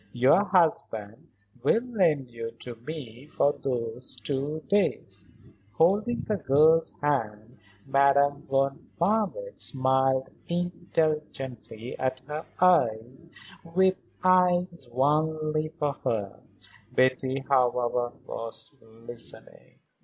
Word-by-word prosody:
Your 135 +11 +4
husband 155 - 0 0.3
will 230 - +3
lend 170 - +1
you 115 0 -6
to 125 - -6
me 125 0 -9
for 145 -2 +2
those 125 -1 -3
two 145 +3 -3
days." 100 - 0 0.5
Holding 205 - +2
the 210 - -1
girl's 155 +2 +4
hand 115 -5 -1 0.3
Madame 140 +1 +3
von 135 +3 0
Marwitz 220 - 0
smiled 130 0 +1 0.2
indulgently 155 - -2
at 130 0 -1
her, 155 -5 +2 0.7
with 185 +3 +1 0.2
eyes 180 -5 +3
only 155 +3 +1
for 150 -3 -2
her. 100 -4 -2 0.5
Betty, 130 +1 +1
however, 125 -2 +1
was 115 +4 -5 0.3
listening. 120 -1 -6
140 Hz, 95 wpm, -27 LUFS, 125-165 Hz, 0.7 s, Your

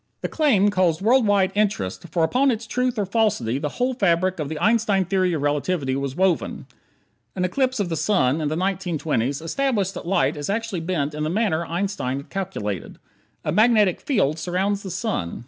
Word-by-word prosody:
The - - -1
claim 215 -11 +3
caused 185 -3 +1
world 240 +1 +4
wide 200 -2 +3
interest, 195 - -1
for 165 +1 0
upon 255 +12 +3
its 230 -2 -1
truth 250 +2 -1
or 205 - 0
falsity 185 - 0
the 150 0 -2
whole 250 +1 +1
fabric 185 -5 +1
of 150 -2 -3
the 160 - -4
Einstein 210 -1 +2
Theory 185 -1 +1
of 150 -3 -2
Relativity 145 -1 0
was 140 -1 -3
woven. 185 -2 0 0.7
An 180 -1 0
eclipse 260 +6 0
of 195 -4 -1
the 165 - -1
sun 155 -4 +1
in 150 - -1
the 155 - -1
1920's 160 -8 -1
established 200 +1 -1
that - - -8
light 155 -5 +2
is 145 +3 -4
actually 225 -2 -2
bent 160 -4 -2
in 150 - -5
the 155 - 0
manner 180 -3 0
Einstein 170 -7 -2
had 140 - -9
calculated. 140 - -4 0.5
A - - 0
magnetic 215 -4 +3
field 165 - +1
surrounds 190 +4 -1
the 195 - -7
sun. 185 - -3
185 Hz, 190 wpm, -23 LUFS, 155-210 Hz, 0.7 s, world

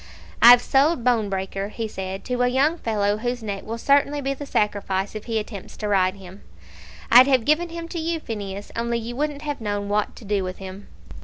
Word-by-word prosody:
"I've 245 +1 +9
sold 275 0 +2
Bonebreaker," 200 -4 -1
he 225 +1 -4
said, 190 -1 -6
"to 250 0 -2
a 245 - +4
young 280 +7 +1
fellow 205 -2 0
whose 245 +1 -3
neck 200 -2 -4
will 225 +1 -4
certainly 285 +3 +2
be 275 0 -1
the 280 +1 -8
sacrifice 200 -3 -1
if 215 -1 -7
he 230 -2 -2
attempts 210 -2 -6
to 210 - -3
ride 190 -2 +2
him. 190 0 -13 0.7
I'd 250 +3 +9
have 260 -4 +2
given 330 +3 +2
him 335 0 -6
to 340 - -4
you, 325 +1 -2
Phineas, 205 -6 -6
only 235 0 -1
you 235 +1 -6
wouldn't 295 +1 -3
have 290 -4 -4
known 205 -1 -3
what 210 0 0
to 225 - -12
do 200 -1 0
with 185 0 -5
him." 195 +1 -9
225 Hz, 210 wpm, -23 LUFS, 200-270 Hz, 0.7 s, I've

